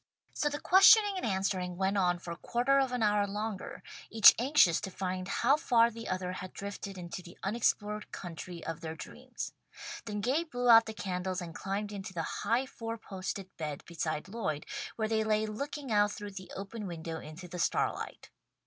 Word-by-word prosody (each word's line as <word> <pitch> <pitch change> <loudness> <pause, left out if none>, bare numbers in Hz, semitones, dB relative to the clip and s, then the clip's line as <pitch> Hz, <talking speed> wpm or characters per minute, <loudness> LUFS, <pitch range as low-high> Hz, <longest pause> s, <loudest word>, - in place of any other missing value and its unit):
So 295 - +1
the 290 0 -4
questioning 400 +2 +7
and - - -3
answering 190 -3 -1
went 195 +1 +1
on 180 -3 +2
for 170 -1 -6
quarter 245 +8 +2
of 265 -2 +1
an 250 -2 0
hour 205 -1 +3
longer, 210 0 -5 0.3
each 220 -2 +9
anxious 245 - +4
to - - -4
find 185 -1 -3
how 245 +8 +3
far 235 -6 +4
the 230 +1 -8
other 185 -1 -2
had 185 0 -7
drifted 200 -1 -6
into 175 0 -6
the 175 -1 -13
unexplored 210 0 0
country 175 -1 -7
of 165 0 -4
their 160 -1 -5
dreams. - - -7 0.5
Then 210 -2 -3
Gay 270 +9 +1
blew 245 -6 -1
out 225 0 +8
the 220 - -6
candles 185 -2 -2
and 170 -2 -7
climbed 200 +4 -3
into 195 -2 -6
the 165 - -1 0.2
high 245 +3 +2
four 230 -3 -6
posted 190 -2 -6
bed 150 -3 -4
beside 155 -2 -3
Lloyd, 185 -9 -3 0.3
where 220 -1 -1
they 220 0 +1
lay 215 0 +2
looking 275 +5 -5
out 205 -1 +4
through 205 0 -7
the 190 -1 -9
open 200 +2 -6
window 165 -1 -5
into 160 +4 -9
the 180 +1 -7
starlight. - - -1
200 Hz, 185 wpm, -31 LUFS, 180-230 Hz, 0.5 s, each